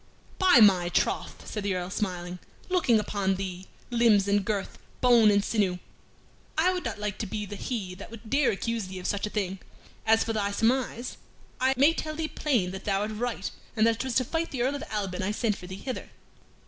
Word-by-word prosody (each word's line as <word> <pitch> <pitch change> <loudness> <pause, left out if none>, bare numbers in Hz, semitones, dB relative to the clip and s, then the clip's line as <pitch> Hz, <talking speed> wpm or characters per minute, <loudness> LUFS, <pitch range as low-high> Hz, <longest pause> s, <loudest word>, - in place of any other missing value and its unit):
"By 365 -10 +7
my 185 -4 +6
troth!" - - -1
said 210 - -4
the 200 -2 -1
Earl, 180 0 -3
smiling, 180 -3 -3 0.3
"looking 300 -12 +3
upon 200 -2 0
thee 185 -1 -5 0.2
limbs 225 -4 +4
and 200 0 +2
girth, 205 -1 -3 0.2
bone 240 -4 +6
and 200 0 +3
sinew 195 -5 +1 0.8
I 360 +4 +4
would 360 - -3
not - - -3
like 210 -1 -4
to 215 - -2
be 210 +2 -3
the 205 - -7
he 200 -3 -4
that 190 +2 -10
would 230 0 -11
dare 275 +2 +3
accuse 230 0 -2
thee 190 0 -7
of 180 - -8
such 205 +1 0
a - - -5
thing. 195 -3 -2 0.5
As 225 0 +5
for 225 - -2
thy 205 -2 0
surmise, 240 +2 0 0.4
I 260 +1 +3
may 285 +5 +6
tell 310 -1 -4
thee 320 0 -2
plain 240 -14 0
that 190 - -8
thou 195 -1 +1
art 210 +1 -2
right, 220 -2 -3 0.2
and 220 -1 +4
that 230 -1 +3
it - - -2
was 260 -3 -3
to 255 - +3
fight 330 +5 -1
the 250 -3 -2
Earl 265 +3 +1
of 285 - -4
Alban 195 -3 -2
I 190 - -1
sent 210 0 0
for 180 - -10
thee 185 - -6
hither. 255 +6 -5
215 Hz, 220 wpm, -28 LUFS, 195-245 Hz, 0.8 s, By